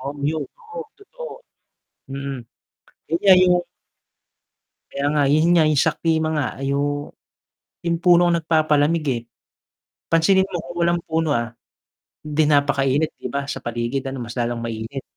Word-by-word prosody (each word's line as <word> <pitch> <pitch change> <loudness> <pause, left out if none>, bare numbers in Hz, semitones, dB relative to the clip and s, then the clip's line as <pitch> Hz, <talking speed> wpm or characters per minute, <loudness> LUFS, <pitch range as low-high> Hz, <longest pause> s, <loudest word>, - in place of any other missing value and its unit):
Oo 140 +2 -5
yun, 160 0 -2
totoo, 470 -1 -9
totoo, - - -10 0.8
mm. 140 -1 -4 0.7
Yun 165 +2 0
nga 195 -2 +8
yung 180 -1 +4 1.4
Kaya 140 - -4
nga 145 - +3
yun 155 +3 +4
nga 165 -2 +5
yung 150 -2 +2
sa 160 +1 +3
klima 160 -1 0
nga 145 -4 0 0.2
yung 145 +1 -1 0.7
yung 170 0 0
puno 175 -1 +5
ang 170 -1 +2
nagpapalamig, 155 0 +2
eh. 120 - -2 0.9
Pansinin 190 +4 +3
mo 195 -2 -5
kung 175 +1 -9
walang 170 0 +2
puno, 160 -2 0
ah, 120 -2 -1 0.7
'di 150 +1 +1
napakainit 145 +1 +2
'di - - -5
ba 140 +3 -2
sa 140 - -5
paligid 120 +3 -3
ano, 135 -2 -5
mas 115 0 -8
lalong 120 0 -2
mainit. 115 +4 -5
150 Hz, 150 wpm, -22 LUFS, 135-170 Hz, 1.4 s, nga